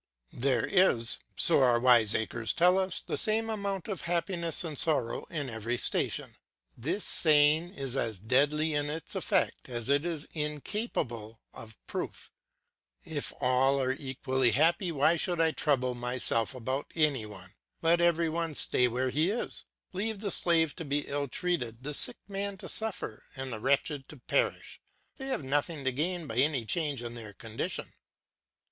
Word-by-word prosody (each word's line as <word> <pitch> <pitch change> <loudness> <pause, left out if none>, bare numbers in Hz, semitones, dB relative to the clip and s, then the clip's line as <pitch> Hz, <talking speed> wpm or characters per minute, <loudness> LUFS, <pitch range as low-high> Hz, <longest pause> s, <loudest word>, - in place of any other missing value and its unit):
There 125 -2 +1
is, 120 - +3 0.2
so 170 -5 +6
our 120 -2 +4
wiseacres 115 -2 +4
tell 180 +2 +4
us, 185 -1 -2
the - - -1
same 225 0 +2
amount 200 -3 -3
of 200 -4 -4
happiness 170 0 0
and 155 -5 -3
sorrow 140 -8 +1
in 145 -4 -4
every 115 0 -3
station. - - -1 0.4
This 170 - -2
saying 155 +3 +4
is 135 -2 -2
as 115 -6 -1
deadly 145 - +2
in 145 0 0
its 160 +2 -5
effects - - 0
as 120 0 -3
it 140 +1 +3
is 165 -3 -3
incapable 150 - -3
of 110 -1 -11
proof; - - -6 0.7
if 150 -3 -3
all 135 +1 +3
are 130 -1 +1
equally 130 -2 0
happy 170 - +2
why 155 +3 +3
should 175 +1 0
I 165 -1 +3
trouble 130 -5 +1
myself 120 -1 -1
about 130 +3 -4
any 145 -9 +1
one? 95 -3 -11 0.3
Let 170 +1 +4
every 170 -1 +3
one 165 -1 -2
stay 125 - +4
where 125 +2 -1
he 155 +7 +2
is; 225 +4 -3 0.3
leave 210 +3 -2
the 200 -1 -2
slave 165 -3 +3
to 170 - -4
be 145 0 0
ill 140 0 -2
treated, 130 -7 -2
the 150 +1 -4
sick - - 0
man 200 0 -3
to - - -9
suffer, 220 - -3
and 130 -2 -5
the 110 - -5
wretched 140 +2 0
to 150 - -11
perish; 125 - -2 0.4
they 270 - -6
have 260 - -2
nothing 145 +2 -1
to 130 - +1
gain 170 +6 -1
by 115 -5 -6
any 135 -3 +2
change 145 -2 -1
in 120 0 -6
their 110 -3 -9
condition. 115 +1 -5
145 Hz, 165 wpm, -29 LUFS, 125-170 Hz, 0.7 s, so